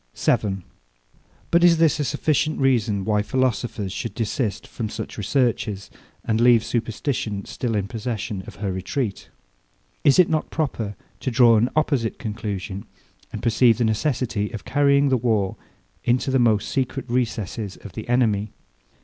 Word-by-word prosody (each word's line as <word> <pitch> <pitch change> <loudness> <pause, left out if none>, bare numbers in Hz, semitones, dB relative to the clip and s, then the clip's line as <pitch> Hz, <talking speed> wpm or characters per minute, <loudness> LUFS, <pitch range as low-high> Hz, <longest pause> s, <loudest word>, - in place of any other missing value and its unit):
7. 95 -3 0 0.9
But 170 +1 +4
is 170 -1 +6
this 160 -2 +3
a - - +1
sufficient 155 +4 0
reason, 115 -7 +2
why 105 -1 +2
philosophers 120 -4 -1
should 115 - -5
desist 115 -2 -2
from 110 -2 -5
such - - -6
researches, 105 -4 -1 0.3
and 110 0 +1
leave 120 -2 +5
superstition 115 -3 -2
still 115 -3 -3
in 100 -1 -1
possession 110 -3 -4
of - - -9
her 100 -1 -3
retreat? 100 +4 -3 0.7
Is 140 - +5
it 180 -2 +6
not 155 -1 -1
proper 115 -10 -2 0.2
to - - -2
draw 120 -1 +6
an 115 +3 +3
opposite 140 -7 +1
conclusion, 105 -3 -5 0.5
and - - -6
perceive 115 0 +4
the 120 - +1
necessity 110 -2 0
of 110 - -8
carrying 140 -1 +3
the 130 - +3
war 110 -5 0 0.5
into 125 +3 +1
the 130 - +3
most 110 -4 +2
secret 130 -1 -2
recesses 110 -4 -2
of 100 - -11
the 110 +3 -7
enemy? 110 -4 +2
115 Hz, 150 wpm, -23 LUFS, 105-130 Hz, 0.9 s, is